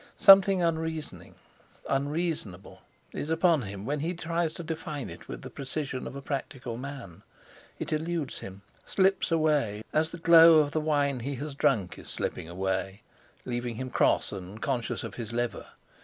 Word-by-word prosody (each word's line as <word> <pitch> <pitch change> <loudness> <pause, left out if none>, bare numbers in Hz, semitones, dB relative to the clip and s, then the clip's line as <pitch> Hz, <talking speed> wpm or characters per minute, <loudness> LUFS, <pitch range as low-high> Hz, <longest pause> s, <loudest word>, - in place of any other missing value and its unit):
Something 195 -2 +7
unreasoning, 160 -1 -3 0.5
unreasonable, 140 - -2 0.3
is 150 - -5
upon 165 -1 +3
him; 100 -2 -7
when 145 +4 -1
he 170 +5 -2
tries 165 0 -1
to 170 - -6
define 155 -3 -5
it - - -11
with - - -7
the - - -8
precision 135 -1 -4
of - - -8
a 140 - -7
practical 135 -4 -4
man, 125 -9 -8 0.6
it - - -3
eludes 160 -2 -2
him, 95 +1 -10 0.2
slips 190 -2 +1
away, 150 -10 +1
as 160 +1 +2
the 170 - -7
glow 165 -1 +8
of 150 -2 +3
the 155 - 0
wine 145 -3 +1
he 135 +4 -4
has 145 +2 -5
drunk 100 -8 +1
is - - -9
slipping 80 - -4
away, 95 +2 -2 0.4
leaving 120 -1 -3
him 130 +2 -5
cross, - - +2
and 95 +2 -8
conscious 125 -2 -2
of - - -6
his 115 0 -6
liver. 120 0 -2
140 Hz, 165 wpm, -28 LUFS, 115-160 Hz, 0.6 s, glow